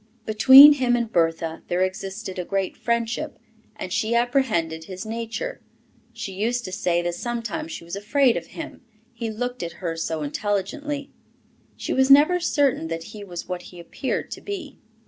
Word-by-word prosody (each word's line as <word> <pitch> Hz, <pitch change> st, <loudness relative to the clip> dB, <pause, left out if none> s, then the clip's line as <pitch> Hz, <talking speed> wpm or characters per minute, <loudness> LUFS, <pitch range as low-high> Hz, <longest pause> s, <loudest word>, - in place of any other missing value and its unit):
Between 265 Hz, +7 st, +9 dB
him 255 Hz, -3 st, +1 dB
and 235 Hz, -2 st, -2 dB
Bertha 165 Hz, -2 st, 0 dB
there 180 Hz, +1 st, +1 dB
existed 190 Hz, 0 st, -4 dB
a -, -, -1 dB
great 195 Hz, +1 st, -2 dB
friendship, 235 Hz, -1 st, -2 dB, 0.4 s
and -, -, -6 dB
she 225 Hz, +2 st, 0 dB
apprehended 225 Hz, -11 st, 0 dB
his 185 Hz, +3 st, -7 dB
nature; 230 Hz, -, -4 dB, 0.5 s
she 195 Hz, -, -6 dB
used 235 Hz, +5 st, -1 dB
to 185 Hz, -, -6 dB
say 175 Hz, -2 st, 0 dB
that 175 Hz, 0 st, -1 dB
sometimes 240 Hz, -, -4 dB
she -, -, -7 dB
was 170 Hz, +2 st, -6 dB
afraid 240 Hz, +5 st, +2 dB
of -, -, -4 dB
him, 320 Hz, -1 st, -7 dB, 0.3 s
he 230 Hz, -1 st, -4 dB
looked 245 Hz, +3 st, -4 dB
at 170 Hz, -1 st, -4 dB
her 170 Hz, -3 st, -4 dB
so 165 Hz, -1 st, -3 dB
intelligently; 245 Hz, -, -3 dB, 0.7 s
she -, -, -3 dB
was 265 Hz, 0 st, +3 dB
never 300 Hz, +6 st, +7 dB
certain 285 Hz, -, +1 dB
that 165 Hz, 0 st, -4 dB
he 210 Hz, -1 st, -8 dB
was 175 Hz, -3 st, -7 dB
what 180 Hz, -1 st, -4 dB
he 175 Hz, -, -13 dB
appeared 170 Hz, +9 st, -4 dB
to -, -, -7 dB
be. 375 Hz, -8 st, -7 dB
220 Hz, 170 wpm, -24 LUFS, 180-265 Hz, 0.7 s, Between